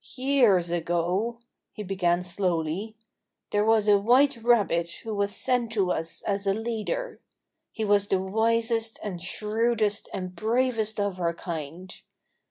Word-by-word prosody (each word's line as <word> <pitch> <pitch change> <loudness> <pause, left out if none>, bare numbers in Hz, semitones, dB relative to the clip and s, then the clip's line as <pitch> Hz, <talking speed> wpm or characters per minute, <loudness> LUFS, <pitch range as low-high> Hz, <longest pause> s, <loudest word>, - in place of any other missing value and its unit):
"Years 245 -10 +3
ago," 175 +7 -1 0.4
he 210 - -6
began 180 -2 0
slowly, 180 +2 -2 0.6
"there 205 0 +2
was 220 -1 +3
a 205 -1 +6
white 255 +7 +4
rabbit 210 -8 +2
who 225 -2 -4
was 200 0 -1
sent 245 -3 +1
to 195 -4 +1
us 165 0 -4
as 200 -1 -2
a 195 - +2
leader. 235 - -3 0.5
He 220 - -3
was 205 -1 +3
the 190 - +1
wisest 225 +3 0
and 185 -5 -5
shrewdest 215 +2 -1
and 185 -2 -5
bravest 225 -1 0
of 200 -2 -1
our 170 -1 0
kind. 170 +2 -6
205 Hz, 140 wpm, -26 LUFS, 180-225 Hz, 0.6 s, a